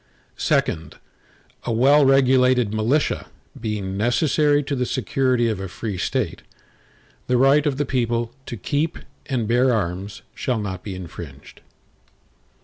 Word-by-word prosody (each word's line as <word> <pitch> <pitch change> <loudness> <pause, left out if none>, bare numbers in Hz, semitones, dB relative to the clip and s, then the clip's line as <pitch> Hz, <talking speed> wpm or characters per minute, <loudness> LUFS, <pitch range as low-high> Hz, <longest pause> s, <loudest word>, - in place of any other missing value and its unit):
II - - +6 1.0
A - - -1
well 135 +6 +5
regulated 130 -4 +4
militia, 115 +8 0 0.3
being 105 -4 -3
necessary 145 +6 +2
to 140 0 -2
the 125 -1 -1
security 130 -3 +1
of 110 -4 -1
a 95 - -4
free 100 +3 -5
State, 90 - -2 0.9
the 125 - +2
right 140 +4 +4
of 135 -2 -1
the 145 - 0
people 120 -2 -1
to 120 - -5
keep 145 - -1 0.3
and 125 -6 -1
bear 125 +3 +3
arms, 100 -1 -3
shall 125 -3 -1
not 95 -4 -4
be 100 -3 -6
infringed. 85 -6 -10
120 Hz, 135 wpm, -22 LUFS, 105-135 Hz, 1.0 s, II